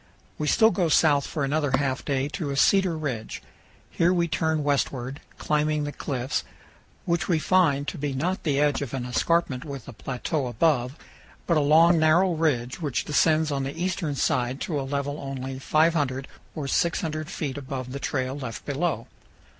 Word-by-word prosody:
We 150 - -1
still 220 +7 +5
go 180 -6 +1
south 145 -3 +4
for 150 - -3
another 145 0 0
half 135 -2 -1
day 135 -1 0
to 155 -2 -4
a 140 - -3
cedar 190 0 +3
ridge; 125 -8 -4 0.5
here 170 +1 +2
we 170 -2 +2
turn 155 0 0
westward, 140 -2 -1 0.2
climbing 150 0 0
the 145 - -3
cliffs, 130 -2 -3 0.6
which 170 +2 0
we 175 -4 +2
find 155 -4 +2
to - - -4
be 145 0 -2
not 170 +8 -1
the 145 -4 0
edge 145 -1 +2
of 135 -2 -4
an 125 -2 -3
escarpment 130 +1 0
with 140 -5 -8
a 135 - -8
plateau 135 +4 -3
above, 125 +1 +1 0.5
but 170 - +2
a - - +4
long 165 +4 +5
narrow 170 +4 +4
ridge 145 -3 -1
which 145 -6 -1
descends 155 +1 +2
on 140 -1 -1
the 135 +4 -5
eastern 180 -4 -1
side 125 0 0
to 150 -5 -2
a 135 - -6
level 145 +1 -2
only 135 -1 -5
500 145 -3 +1 0.3
or 150 -3 -4
600 155 0 -1
feet 145 -7 -4
above 130 -2 -6
the 140 - -5
trail 130 -1 -2
left 125 -4 -6
below. 145 -4 -1
145 Hz, 180 wpm, -25 LUFS, 135-160 Hz, 0.6 s, still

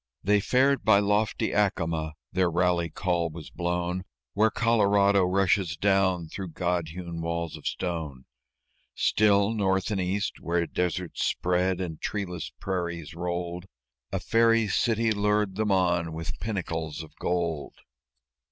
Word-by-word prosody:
They 105 +2 +4
fared 135 +6 +2
by 110 -2 +6
lofty 105 +1 +1
Acoma; 85 -6 0 0.2
their 90 -1 +2
rally 85 0 +1
call 85 -2 -1
was 80 -1 -10
blown 90 +1 -2 0.3
Where 110 +2 +4
Colorado 100 -3 +3
rushes 90 -2 +1
down 95 -3 +2
through 90 0 -7
God 90 -1 -1
hewn 85 0 -6
walls 85 0 -3
of - - -7
stone; 80 -8 -4 0.7
Still, 105 0 +3
North 95 -1 0
and 100 -2 0
East, 95 +3 -2
where 85 0 0
deserts 90 0 -2
spread, 90 +1 +1
and 85 -4 -5
treeless 90 -8 -3
prairies 85 -5 -3
rolled, 85 +1 -4 0.4
A - - -1
Fairy 115 -1 +3
City 115 +2 +1
lured 105 -1 +1
them 105 0 0
on 85 -3 +1
with 80 +4 -5
pinnacles 80 -7 -3
of 80 - -15
gold. 85 -4 -2
90 Hz, 135 wpm, -27 LUFS, 85-100 Hz, 0.7 s, by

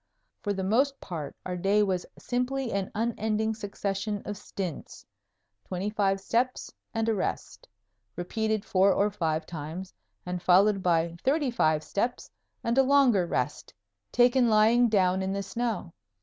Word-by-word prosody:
For 205 - -1
the 190 -1 -2
most 265 +8 +2
part 160 -6 -6
our 180 - -3
day 195 +4 +2
was 185 -3 -1
simply 250 0 -2
an 195 -1 -1
unending 220 -1 0
succession 205 -1 -3
of 205 - -4
stints 185 -4 -6 0.6
twenty 190 +3 -3
five 195 -2 +1
steps 245 +5 -1 0.2
and 225 0 -1
a 225 - +3
rest, 200 - -4 0.5
repeated 220 +3 -2
four 190 +1 +4
or 205 +2 +2
five 160 -5 -1
times 165 +4 -7 0.3
and 180 0 -3
followed 195 +3 +4
by 170 -1 +1
thirty 280 -1 +2
five 155 -9 +2
steps 240 +5 -2 0.3
and 235 +3 +2
a - - +7
longer 260 -9 +4
rest, 125 - -3 0.4
taken 245 0 +4
lying 225 +3 +5
down 190 -3 +2
in 190 0 -1
the 200 0 -2
snow. 215 -4 -3
205 Hz, 150 wpm, -28 LUFS, 185-230 Hz, 0.6 s, a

